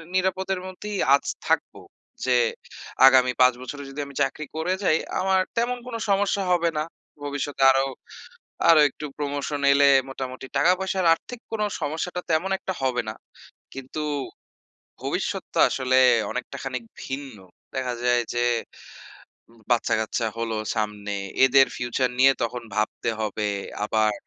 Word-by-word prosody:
নিরাপদের 190 0 0
মধ্যেই 200 +2 -6 0.2
আছি - - -2
থাকবো। - - 0 0.4
যে - - +3 0.7
আগামী 130 -1 +5
৫ 125 0 +7
বছরে 140 +3 -7
যদি 140 +2 -8
আমি 140 -1 -12
চাকরি 150 +3 -3
করে 165 +4 0
যাই 160 -3 +4 0.2
আমার 190 0 +3 0.2
তেমন 245 +1 +1
কোনো 230 -2 -4
সমস্যা 200 0 +2
হবে 170 -1 +3
না। - - 0 0.4
ভবিষ্যতে 145 -1 -2
আরো 135 0 +2 0.8
আরো 165 -2 +8
একটু 150 - -8
প্রমোশন 145 0 -3
এলে 140 0 +5 0.2
মোটামুটি 130 0 -6
টাকা 170 +5 +5
পয়সার 190 -1 -1
আর্থিক 235 +8 -7
কোনো 215 -1 0 0.2
সমস্যাটা 165 +4 -3
তেমন 175 +5 +1
একটা 190 - -4
হবে 125 -2 +1
না। 110 - -6 0.6
কিন্তু, 135 +3 -6 1.0
ভবিষ্যৎ - - -2
তো - - 0
আসলে 130 -1 +1 0.3
অনেকটা 125 +2 -5
খানিক 130 -3 -4 0.2
ভিন্ন। 135 -4 -6 0.4
দেখা 130 -2 -1
যায় 120 0 +3
যে, 120 - 0 1.3
বাচ্চাকাচ্চা 110 0 +1
হলো 115 -1 -2 0.2
সামনে। 105 -1 -3 0.3
এদের 135 +1 +6
ফিউচার 120 +1 0
নিয়ে 135 +1 +7
তখন 120 +1 -3
ভাবতে 110 +2 -1
হবে। 105 0 -1 0.4
আবার, 110 -1 +2
135 Hz, 135 wpm, -24 LUFS, 125-180 Hz, 1.3 s, আরো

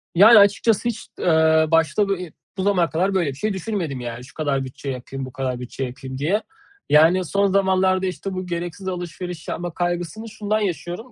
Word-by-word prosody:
Yani, 215 +4 +9
açıkçası 205 +3 +3
hiç, 225 - -6
eee, 160 -1 +4
başta 165 +5 +3
bu 195 - +1
i 180 -4 -8 0.2
bu 190 - -1
zamana 180 -4 +2
kadar 185 +5 0
böyle 170 -6 +1
bir 135 - -6
şey 215 +7 -2
düşünmedim. 180 - -3
Yani 120 0 -6
şu 125 - -16
kadar 140 -4 -1
bütçe 135 +2 -7
yapayım, 135 +1 -5
bu 130 - -9
kadar 130 -2 -3
bütçe 125 +2 -5
yapayım 130 +1 -6
diye. 185 +10 0 0.5
Yani, 165 +5 +5
son 200 +3 +2
zamanlarda, 190 -1 +2
işte, 185 +2 -4
bu 185 0 -4
gereksiz 175 +2 -5
alışveriş 175 -1 -5
yapma 175 -1 -4
kaygısını 175 +5 -3
şundan 215 0 -1
yaşıyorum. 195 +4 -4
175 Hz, 190 wpm, -22 LUFS, 150-195 Hz, 0.5 s, Yani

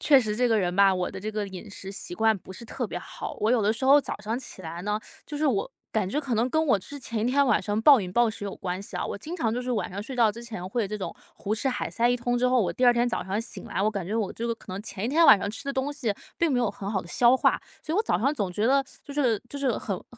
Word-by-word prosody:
确 285 -3 +6
实 210 -2 -2
这 245 +2 +2
个 225 - +3
人 180 -2 0
吧， 195 0 +6
我 180 -1 -1
的 190 - -7
这 215 - -3
个 210 -1 -2
饮 190 +2 -9
食 195 -1 -8
习 185 - -8
惯 220 +3 +3
不 190 0 -11
是 235 - -9
特 - - -4
别 - - -4
好。 - - -7
我 220 +3 +2
有 230 -4 +3
的 210 - +3
时 235 +4 -4
候， 280 +2 +7
早 210 - -6
上 220 +2 -2
起 255 - -8
来 170 +2 -6
呢， 210 +1 0 0.3
就 295 0 -6
是 310 - +2
我 230 -8 0 0.2
感 200 -4 0
觉 295 - 0
可 265 -5 -2
能 235 +4 +1
跟 315 +2 +2
我 255 - +5
之 285 +9 -8
前 230 -3 -4
一 - - 0
天 280 +1 +4
晚 - - +3
上 210 0 -1
暴 280 -3 +8
饮 180 -2 -5
暴 240 +1 +4
食 215 -1 -6
有 200 - -4
关 185 +1 -4
系 - - -7
啊。 - - -2
我 - - -4
经 315 - -6
常 230 -9 0
就 250 - -2
是 250 - -3
晚 230 - -1
上 200 +3 -5
睡 255 +3 -6
觉 225 -3 +4
之 235 +2 -9
前 200 -6 -6
会 235 +3 0
有 195 - -2
这 210 0 -4
种 190 - -5 0.2
胡 210 +2 -2
吃 265 +5 -1
海 250 - -2
塞 235 +1 +1
一 245 - +3
通 245 0 -1
之 250 +1 +2
后， 255 -1 +4
我 195 - 0
第 255 - 0
2 245 - +7
天 240 +1 +2
早 235 - -2
上 195 +4 -2
醒 230 - -8
来， - - -3
我 210 - +3
感 200 -4 -3
觉 210 +5 -2
我 215 -4 -1
这 230 - -5
个 235 - 0
可 215 -4 -9
能 195 +2 -5
前 210 -1 -5
一 - - 0
天 325 +5 +4
晚 215 - +9
上 200 - -3
吃 220 - -6
的 275 - -2
东 270 +2 -1
西 240 -8 -1 0.2
并 335 -2 +2
没 250 - +2
有 240 -3 +2
很 200 0 -5
好 195 - 0
地 170 - -12
消 240 +7 +4
化， - - +2 0.2
所 315 - -3
以 - - +1
我 430 - +3
早 175 - +1
上 275 +7 +1
总 200 -8 -1
觉 210 +5 0
得， 275 +1 +4 0.2
就 285 - -9
是 250 -7 +2
就 285 - -7
是 275 -2 +1
很 195 -3 -3
很 - - -12
225 Hz, 360 characters per minute, -26 LUFS, 200-255 Hz, 0.3 s, 晚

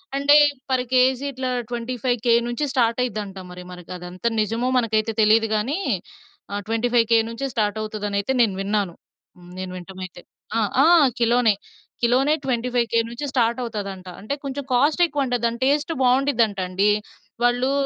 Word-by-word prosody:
అంటే 280 +1 +5 0.3
per 255 -1 +1
KG 255 +1 +3
ఇట్లా 260 0 -3 0.2
25000 245 0 -1
నుంచి 240 +5 -2
స్టార్ట్ 235 -3 +2
అయ్యిద్దంట. 210 -5 -4
మరి 180 0 -9
మనకి 180 -1 -11
అదంతా 180 +4 -5
నిజమో 225 +4 -1
మనకైతే 225 -2 +1
తెలీదు 220 +1 +4
గానీ. 240 +9 -1 0.7
ఆహ్, 205 0 -3
25000 230 0 +2
నుంచే 230 +4 -4
స్టార్ట్ 215 -3 0
అవుతదని 210 -1 -3
అయితే 205 +6 -1
నేను 215 -5 +2
విన్నాను. 200 -2 -1 0.6
నేను 185 0 -5
వినటం 185 +1 -10
అయితే. 180 -1 -12 0.4
ఆ! - - +2 0.2
ఆ! - - +5 0.3
కిలోనే. 235 -1 +3 0.5
కిలోనే 255 +5 +3
25000 240 -2 0
నుంచే 240 +5 -5
స్టార్ట్ 235 -1 +1
అవుతుందంట. 200 -5 -6
అంటే, 215 +7 -4
కొంచెం 280 0 -4
కాస్ట్ 290 +7 +3
ఎక్కువంట. 280 -6 -2
దాని 235 0 -1
టేస్ట్ 290 +4 +1
బాగుండిదింట 245 -5 +2
అండి. 195 +3 +2 0.5
వాళ్ళు 245 +2 +2
235 Hz, 145 wpm, -22 LUFS, 210-255 Hz, 0.7 s, అంటే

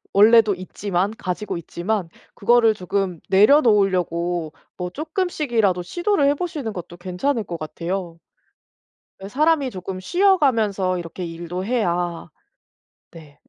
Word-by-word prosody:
원래도 215 0 +6
있지만, 185 +1 -2
가지고 185 0 -4
있지만 175 +3 -3 0.3
그거를 230 +1 +4
조금 185 -2 -2
내려놓으려고 185 - +3 0.2
뭐 180 -1 -3
조금씩이라도 290 - 0
시도를 345 - 0
해 290 - +2
보시는 290 - -4
것도 175 -1 -8
괜찮을 200 +8 -2
것 170 -3 -6
같아요. 170 +2 -5 1.0
왜 195 - -7
사람이 295 +1 +2
조금 185 -1 -6
쉬어가면서 225 - +2
이렇게 175 +1 -6
일도 170 +2 -5
해야 175 -7 -1 0.8
네, 150 -3 -14
195 Hz, 290 characters per minute, -22 LUFS, 175-240 Hz, 1.0 s, 원래도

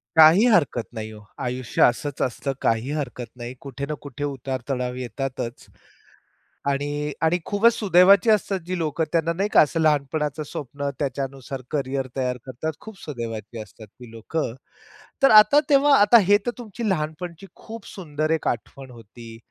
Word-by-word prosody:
काही 160 +8 +7
हरकत 145 - +2
नाही 110 -1 -5
हो. 105 -1 -12 0.2
आयुष्य 125 0 -3
असंच 135 +3 +1
असतं, 135 +3 -1
काही 115 +5 0
हरकत 125 -5 -4
नाही. 120 0 -7
कुठे 140 0 -6
ना 150 - -4
कुठे 145 0 -7
उतार 135 -2 -4
चढाव 125 -1 -2
येतातच. 125 0 -4 1.1
आणि 145 +1 -1
आणि 160 +2 +3
खूपच 220 +3 +3
सुदैवाची 195 +1 +5
असतात 200 -2 +2
जी 185 0 -2
लोकं 160 0 -1
त्यांना 165 0 +1
नाही 200 +4 -1
का - - +8
असं 155 +2 +1
लहानपणाचं 150 0 0
स्वप्न 140 0 -5
त्याच्यानुसार 135 -1 -4
करियर 135 -2 -2
तयार 125 -1 -1
करतात, 135 +5 -4
खूप 220 -3 -11
सुदैवाची 115 -5 -6
असतात 110 +1 -13
ती 120 +3 -15
लोकं. 115 +3 -3 0.7
तर 270 - +7
आता 215 +7 +8
तेव्हा 280 0 +5
आता 210 +3 +7
हे 205 0 +6
तर 240 - 0
तुमची 225 -1 -5
लहानपणची 170 +2 -3
खूप 225 -2 -10
सुंदर 155 -4 -3
एक 160 - 0
आठवण 130 +2 -4
होती. 115 0 -12
145 Hz, 155 wpm, -23 LUFS, 125-175 Hz, 1.1 s, का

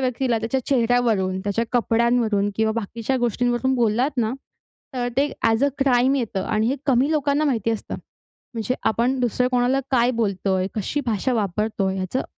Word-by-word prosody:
व्यक्तीला 250 -2 0
त्याच्या 230 +4 -1
चेहऱ्यावरून, 230 -7 +1
त्याच्या 205 +4 -1
कपड्यांवरून 230 -3 +2
किंवा 220 0 +1
बाकीच्या 230 +5 -3
गोष्टींवरून 245 +2 0
बोललात 240 +3 +1
ना, 225 0 +1 0.6
तर 245 -1 -1
ते 285 +2 +1
ॲज 225 +3 +3
अ 285 - +4
क्राईम 265 -1 +3
येतं 225 -7 -2
आणि 215 0 0
हे 270 - 0
कमी 265 +3 +3
लोकांना 295 0 +1
माहिती 230 -6 0
असतं. 225 - -4 0.6
म्हणजे 230 +2 -1 0.2
आपण 245 +4 0
दुसऱ्या 250 +1 +1
कोणाला 250 +2 +2
काय 245 -2 +3
बोलतोय, 190 -2 0
कशी 220 +7 -2
भाषा 230 +3 0
वापरतोय, 200 -1 -1
ह्याचं 190 +8 -2
235 Hz, 155 wpm, -22 LUFS, 215-255 Hz, 0.6 s, अ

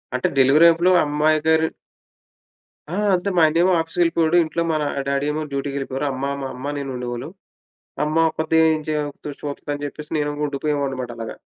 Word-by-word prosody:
అంటే, 130 - +1
డెలివరీ 145 +6 +6
అప్పులు 175 +3 +2
అమ్మాయి 150 +1 +2
గారు 160 0 +4 1.2
ఆ! - - -4 0.2
అంతే 185 +2 -1
మా 165 - +5
అన్నియేమో 175 +4 +3
ఆఫీస్‌కెళ్ళిపోయేవాడు. 165 0 +1
ఇంట్లో 165 +1 -2
మా 160 - +1
నా 145 - -1 0.2
డ్యాడీ 140 +1 0
ఏమో 155 +1 -3
డ్యూటీకి 140 0 -3
వెళ్ళిపోయారు. 135 +1 -3
అమ్మ, 130 +1 -4 0.2
మా - - -3
అమ్మ 130 +3 -5
నేను 140 -1 -4
ఉండేవాళ్ళం. 125 +4 -5 0.7
అమ్మ 155 +1 -2
ఒకత్తె 160 +1 0 0.2
ఏం 155 - -3
చేయ్ 150 -1 0 0.4
చూత్తదని 145 0 -5
చెప్పేసి 150 +1 -9
నేను 145 0 0 0.2
ఉండిపోయేవాడినమాట 140 -3 -2
అలాగా. 115 -1 -6
150 Hz, 160 wpm, -21 LUFS, 140-160 Hz, 1.2 s, డెలివరీ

